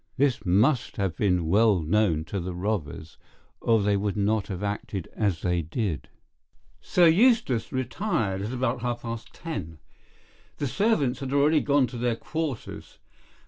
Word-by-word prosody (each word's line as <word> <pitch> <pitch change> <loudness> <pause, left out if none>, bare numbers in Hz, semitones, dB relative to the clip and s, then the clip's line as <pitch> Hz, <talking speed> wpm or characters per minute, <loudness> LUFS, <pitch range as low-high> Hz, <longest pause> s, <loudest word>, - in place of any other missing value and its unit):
This 135 -5 +1
must 115 +9 +2
have 95 -5 -1
been 90 -4 +1
well 105 +3 +4
known 80 -1 +1
to 100 - -4
the 90 0 -5
robbers, 85 -5 -4 0.4
or 115 -3 +2
they 100 0 +2
would 100 -1 -1
not 105 0 +1
have 95 0 -5
acted 100 -3 -4
as 100 -7 -1
they 90 -1 +1
did. 80 - -3 0.7
"Sir 180 - +3
Eustace 165 - +3
retired 125 - -1
about 125 -1 -1
half 120 0 -3
past 115 -1 -6
ten. 95 - -6 0.8
The - - -2
servants 145 - +1
had 135 -1 -5
already 145 +2 +4
gone 140 -2 +3
to 120 0 -7
their 120 -1 +1
quarters. 155 0 -5
110 Hz, 145 wpm, -26 LUFS, 95-130 Hz, 0.8 s, well